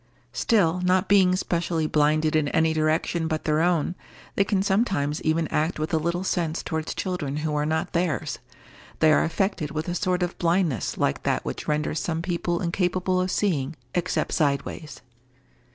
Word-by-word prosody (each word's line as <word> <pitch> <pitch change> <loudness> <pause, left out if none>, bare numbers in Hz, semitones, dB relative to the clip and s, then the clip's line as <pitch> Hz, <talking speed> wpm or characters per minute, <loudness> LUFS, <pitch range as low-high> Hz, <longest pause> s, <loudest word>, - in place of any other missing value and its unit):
Still, 180 -6 +2
not 185 +1 +2
being 185 -2 +5
specially 170 -3 -1
blinded 155 +1 +2
in 155 -2 +2
any 160 +2 +2
direction 160 +1 0
but 155 -1 -2
their 155 0 +1
own, 175 -1 +1 0.4
they 200 - +3
can 195 -1 0
sometimes 190 -8 0
even 160 0 +1
act 155 +3 0
with 155 +2 -3
a 160 - +3
little 170 +3 -1
sense 170 -4 -1
towards 160 0 -3
children 160 -7 -3
who 155 - -1
are 150 0 0
not 160 0 -1
theirs. 170 -4 -1 0.6
They 155 -1 +5
are - - +4
affected 170 -2 -1
with 155 +2 -4
a 175 - -1
sort 180 0 0
of 175 - -4
blindness 170 - 0
like - - 0
that - - -1
which - - -5
renders 150 +1 0
some 165 -1 -2
people 175 -1 -1
incapable 185 +1 0
of 185 - -1
seeing, 160 -7 0 0.2
except 175 0 -1
sideways. 145 0 -1
165 Hz, 170 wpm, -25 LUFS, 155-180 Hz, 0.6 s, being